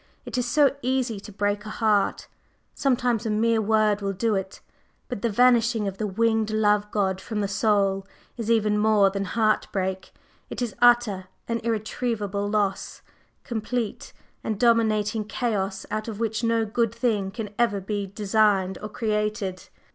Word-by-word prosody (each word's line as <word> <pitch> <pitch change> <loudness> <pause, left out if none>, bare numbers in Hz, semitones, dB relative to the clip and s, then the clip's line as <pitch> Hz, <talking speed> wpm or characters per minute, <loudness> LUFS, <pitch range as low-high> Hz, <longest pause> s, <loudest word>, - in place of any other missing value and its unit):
It - - -6
is 250 -1 0
so 280 +2 +3
easy 250 -4 -1
to 205 - -11
break 205 +1 -1
a 215 - -8
heart; 215 -2 +1 0.5
sometimes 245 -5 0
a - - -1
mere 225 +1 +2
word 215 -1 +2
will 195 0 -1
do 220 +3 0
it. 190 -1 -3 0.5
But 245 -6 -4
the 235 - +1
vanishing 235 -1 +3
of 195 0 -5
the 215 - -1
winged 220 +2 +1
Love 210 -1 +2
god 190 -3 0
from 215 0 -3
the 200 - 0
soul 195 -1 +1 0.3
is 230 -2 -4
even 210 -2 +2
more 210 -2 +4
than 200 0 -2
heart 215 +2 +1
break, 190 -1 -3 0.4
it - - -6
is 240 -4 -2
utter 240 -6 +4 0.2
and 230 -1 -2
irretrievable 215 -2 -2
loss, 205 -2 -1 0.4
complete 230 -2 -3 0.3
and 215 -2 -3
dominating 220 -2 +2
chaos 205 -4 -2
out 215 +1 -3
of 220 -2 -6
which 225 0 -1
no 230 -1 +2
good 230 +1 0
thing 220 -5 0
can 210 +1 -6
ever 230 -4 +2
be 200 +1 -3
designed 200 -1 +1
or 210 - -5
created. 210 -3 -2
215 Hz, 160 wpm, -25 LUFS, 200-230 Hz, 0.5 s, more